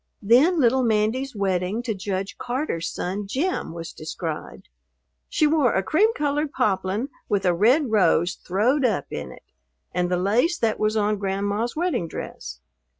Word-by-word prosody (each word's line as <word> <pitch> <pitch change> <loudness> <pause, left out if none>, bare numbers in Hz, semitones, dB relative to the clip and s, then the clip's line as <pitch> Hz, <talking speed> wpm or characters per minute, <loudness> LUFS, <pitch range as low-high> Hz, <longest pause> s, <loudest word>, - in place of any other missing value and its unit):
Then 270 - +5
little 260 0 +4
Mandy's 230 +3 0
wedding 195 +2 -1
to 230 -2 -1
Judge 195 -1 -4
Carter's 245 - -2
son 195 +3 -4
Jim 305 - -1
was 165 0 -7
described. 160 0 -6 0.6
She 310 - +2
wore 295 -5 +3
a 190 - +1
"cream 395 - +3
colored 295 0 -1
poplin 195 +4 0 0.2
with 200 -1 +1
a 180 - +4
red 240 - +3
rose 185 -4 +3
throwed 230 +13 0
up 210 - +1
in 70 -3 -5
it," - - -14 0.5
and 180 0 0
the 180 - +1
lace 235 - +2
that 225 -6 0
was 215 +1 +1
on 210 -1 +1
Grandma's 200 +4 -1
wedding 335 - -1
dress. 65 - -7
210 Hz, 155 wpm, -24 LUFS, 185-260 Hz, 0.6 s, Then